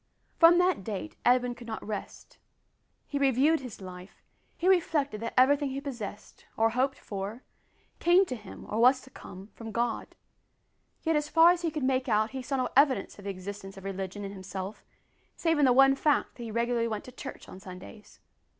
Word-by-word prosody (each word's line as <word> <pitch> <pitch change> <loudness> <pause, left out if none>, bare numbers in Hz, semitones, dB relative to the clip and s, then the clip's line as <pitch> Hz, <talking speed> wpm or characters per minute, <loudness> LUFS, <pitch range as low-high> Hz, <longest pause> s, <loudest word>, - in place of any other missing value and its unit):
From 335 +1 +8
that 360 - +2
date 215 +10 -5
Edwin 245 0 +3
could 240 -1 -12
not 220 -1 -6
rest. 210 -2 -7 0.7
He 285 - -3
reviewed 280 +4 +3
his 250 -6 -9
life. 185 0 -11 0.3
He 350 - -1
reflected 305 - +2
that 230 - -5
everything 280 +2 +4
he 265 +1 -4
possessed, 235 -7 -8
or 225 0 +3
hoped 265 +3 0
for, 205 +5 -6 0.6
came 355 +3 +5
to 255 - -4
him, 210 -4 -11
or 215 - -2
was 255 +3 +6
to 265 - -16
come, 195 -2 -11
from 225 -1 -8
God; 235 +1 -2 0.9
yet 325 -1 +1
as 300 0 0
far 330 +2 +7
as 355 -1 -1
he 340 - 0
could 305 -2 -4
make 260 0 +1
out 215 0 +2
he 265 -1 -5
saw 270 +2 -3
no 255 -1 0
evidence 265 -8 +3
of 200 - -12
the - - -3
existence 195 +1 -7
of 195 - -10
religion 195 +1 -5
in 195 - -6
himself 190 +1 -7 0.5
save 325 -2 +1
in 290 - +5
the 255 - +5
one 270 +2 +6
fact 290 +1 +1
that 245 - -12
he 230 - -5
went - - -8
regularly 235 -2 0
to 255 - -12
church 270 +2 -9
on 185 - -11
Sundays. 190 +3 -12
245 Hz, 195 wpm, -29 LUFS, 205-280 Hz, 0.9 s, From